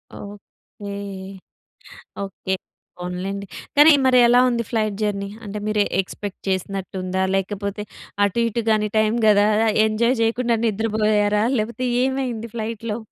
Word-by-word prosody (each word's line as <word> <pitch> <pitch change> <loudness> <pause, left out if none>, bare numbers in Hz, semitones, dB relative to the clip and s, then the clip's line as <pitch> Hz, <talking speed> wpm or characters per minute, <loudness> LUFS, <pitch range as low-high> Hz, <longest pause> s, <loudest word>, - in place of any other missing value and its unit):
Okay. 205 0 -11 1.3
Okay. 190 0 -4 0.4
పోన్లెండి. 185 +3 -4 0.3
కానీ 300 +2 +8
మరి 255 -1 +5
ఎలా 245 +1 +5
ఉంది 235 -1 0
ఫ్లైట్ 215 -3 -1
జర్నీ? 200 -1 -1 0.2
అంటే 210 0 -5
మీరు 215 0 +1
ఎ - - -6
ఎక్స్‌పెక్ట్ 195 +1 -7
చేసినట్టుందా? 190 0 -2
లేకపోతే 200 +1 -2 0.4
అటూ 200 +3 -1
ఇటూ 230 +1 -2
గాని 215 -1 +2
టైం 215 0 +2
గదా, 205 -1 +5 0.4
ఎంజాయ్ 235 +4 +1
చేయకుండా 235 +1 +1
నిద్రపోయారా? 210 -1 +1 0.2
లేపోతే 235 +4 -2 0.2
ఏమైంది 255 -4 -2
ఫ్లైట్‌లో? 225 0 -4
210 Hz, 120 wpm, -22 LUFS, 200-230 Hz, 1.3 s, కానీ